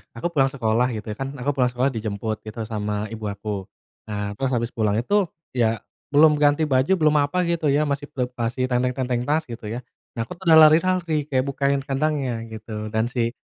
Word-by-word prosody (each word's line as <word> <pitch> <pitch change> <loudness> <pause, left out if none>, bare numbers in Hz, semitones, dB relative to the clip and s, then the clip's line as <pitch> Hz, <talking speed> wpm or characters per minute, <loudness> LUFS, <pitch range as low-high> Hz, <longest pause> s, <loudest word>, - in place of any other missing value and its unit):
aku 115 - -2
pulang 135 -4 +3
sekolah 120 -1 +1
gitu 105 0 -7
ya, 105 - -5
kan 135 0 -2
aku 135 - -1
pulang 125 -2 +3
sekolah 130 +3 +2
dijemput 110 0 -3
gitu 110 +2 -8
sama 105 -1 -2 0.2
ibu 110 -1 -6
aku. 100 +2 -8 0.6
Nah, 105 -1 -3
terus 135 -1 -1
habis 115 -1 -1
pulang 105 -2 0
itu, 125 - -4 0.4
ya 120 -3 +2 0.5
belum 155 +2 +7
ganti 145 +1 +3
baju, 130 +6 +2
belum 155 -1 +4
apa 145 +6 -2
gitu 170 -2 -1
ya, 145 - +3
masih 140 0 -2
ple 125 -1 -1
masih 120 +2 -1
tenteng-tenteng 125 0 0
tas 155 +2 +2
gitu 115 -2 -8
ya. 120 - -3 0.3
Nah 115 - -3
aku - - -19
tuh 190 - -13
udah 160 -1 +8
lari-lari, 160 -1 +4
kayak 130 -3 +1
bukain 140 0 +1
kandangnya 140 -1 -1 0.2
gitu 110 +1 -9 0.2
dan 110 +2 +1
si 120 -2 -1
130 Hz, 200 wpm, -23 LUFS, 115-145 Hz, 0.6 s, udah